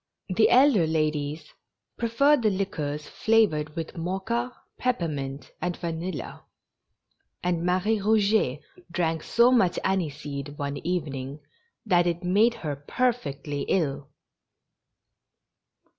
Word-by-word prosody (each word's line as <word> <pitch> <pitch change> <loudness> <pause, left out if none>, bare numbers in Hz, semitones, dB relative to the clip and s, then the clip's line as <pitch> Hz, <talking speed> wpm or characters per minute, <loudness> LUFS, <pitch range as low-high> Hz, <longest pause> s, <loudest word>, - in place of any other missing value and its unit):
The 190 +4 +4
elder 250 - +5
ladies 155 -1 -1 0.4
preferred 265 +5 +3
the 220 - +3
liquors 155 -7 -3
flavored 160 -10 +2
with 165 +2 -5
mocha, 195 +8 -2 0.3
peppermint, 150 - -2
and 180 -1 -2
vanilla; 170 0 -5 1.0
and 175 -2 0
Marie 185 +5 +1
Eouget 205 -9 +2 0.3
drank 165 -2 -1
so 235 +7 +4
much 210 -9 +3
aniseed 145 -6 -2
one 140 0 -3
evening 145 -5 -3 0.5
that 175 -4 +3
it 175 +1 -1
made 210 +6 +3
her 145 -2 -1
perfectly 145 - -2
ill. 145 -6 0
175 Hz, 100 wpm, -26 LUFS, 150-215 Hz, 1.0 s, elder